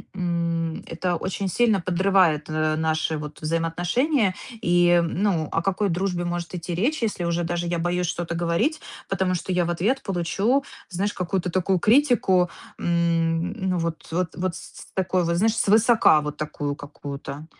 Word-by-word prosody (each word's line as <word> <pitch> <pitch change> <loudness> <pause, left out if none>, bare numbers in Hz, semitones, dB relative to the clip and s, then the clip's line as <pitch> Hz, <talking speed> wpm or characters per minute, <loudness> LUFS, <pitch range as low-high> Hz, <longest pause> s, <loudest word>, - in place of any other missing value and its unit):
м, 170 -2 -1
это 175 +1 -2
очень 190 +3 -3
сильно 220 0 +2
подрывает, 180 -4 +2
э, 155 0 0
наши 160 0 0
вот 150 0 -8
взаимоотношения. 175 - +1 0.3
И, 175 0 +4
м 170 -1 -1
Ну 165 -7 +1
о 165 - +1
какой 195 +2 0
дружбе 175 0 -1
может 175 +1 -4
идти 175 0 -4
речь, 245 - 0
если 190 -5 -1
уже 170 0 0
даже 175 0 -2
я 170 -1 -1
боюсь 175 +1 0
что-то 170 -1 -3
говорить, 175 - 0 0.3
потому 190 -1 0
что 185 +2 -3
я 175 -1 +2
в - - -3
ответ 210 +11 0
получу, 195 - 0 0.3
знаешь, 195 +3 -1
какую-то 180 0 -2
такую 185 +1 +1
критику, 215 - +3 0.3
м, 170 0 +1
ну 190 -4 -1
вот 165 -1 -3
вот 175 0 -1
вот 180 -1 -2
с - - -7 0.2
с - - -11
такого 185 -1 +1
вот, 170 0 0
знаешь, 220 +3 +2
свысока 220 -6 +5
вот 150 0 -5
такую 145 -1 -3
какую-то. 145 +1 -7
175 Hz, 165 wpm, -24 LUFS, 165-190 Hz, 0.3 s, свысока